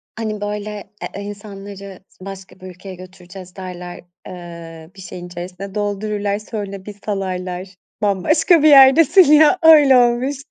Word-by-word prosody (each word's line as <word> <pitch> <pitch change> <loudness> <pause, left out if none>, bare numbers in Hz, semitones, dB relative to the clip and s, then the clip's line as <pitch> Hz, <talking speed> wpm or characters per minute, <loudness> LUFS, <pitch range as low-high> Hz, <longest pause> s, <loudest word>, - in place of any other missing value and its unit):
Hani 215 -2 -5
böyle, 210 0 -5 0.3
eee, 200 - -6
insanları 200 -1 -10
s 185 - -16
başka 195 -1 -11
bir 185 - -11
ülkeye 185 +1 -11
götüreceğiz 185 0 -13
derler, 180 -2 -9 0.2
ııı, 170 -2 -11
bir 190 - -12
şeyin 180 -1 -9
içerisine 180 +3 -9
doldururlar, 205 0 -3
sonra 200 -3 -7
bir 210 - -8
salarlar. 185 -2 -5 0.3
Bambaşka 300 - +2
bir 310 - +6
yerdesin 280 +6 +7
ya 310 +4 +5
öyle 295 -5 +7
olmuştu 255 +4 0
200 Hz, 135 wpm, -18 LUFS, 185-215 Hz, 0.3 s, yerdesin